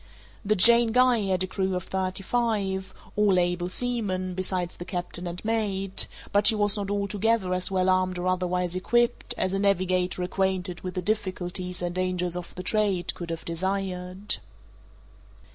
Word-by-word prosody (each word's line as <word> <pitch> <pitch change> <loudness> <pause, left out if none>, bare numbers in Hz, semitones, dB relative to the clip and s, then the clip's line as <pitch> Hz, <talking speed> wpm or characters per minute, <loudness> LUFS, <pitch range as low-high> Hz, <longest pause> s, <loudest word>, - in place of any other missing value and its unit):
The 215 +1 +2
Jane 235 +3 +7
Guy 250 -1 +4
had 185 -1 +1
a - - +1
crew 190 0 -2
of 180 - -2
thirty 190 0 -3
five, 195 -5 -1 0.2
all 205 -3 +3
able 175 0 0
seamen, 195 -6 -1
besides 185 -1 -2
the - - -6
captain 175 -1 -3
and 175 +3 -6
mate, 195 -4 0 0.2
but 205 0 +4
she 220 - +6
was 205 -1 +2
not 200 -2 -3
altogether 205 0 0
as 185 0 +2
well 185 -1 +1
armed 185 -1 +2
or 175 - -3
otherwise 180 -1 0
equipped, 240 +6 +1
as 185 - 0
a 195 - 0
navigator 185 -2 +1
acquainted 185 -2 -1
with 185 -1 -6
the 180 - -2
difficulties 180 -3 -3
and 175 0 -2
dangers 180 -1 0
of 180 -1 -7
the 180 - -6
trade 200 -3 0
could 170 -1 -7
have 165 0 -5
desired. 185 +2 -3
185 Hz, 165 wpm, -26 LUFS, 180-205 Hz, 0.2 s, Jane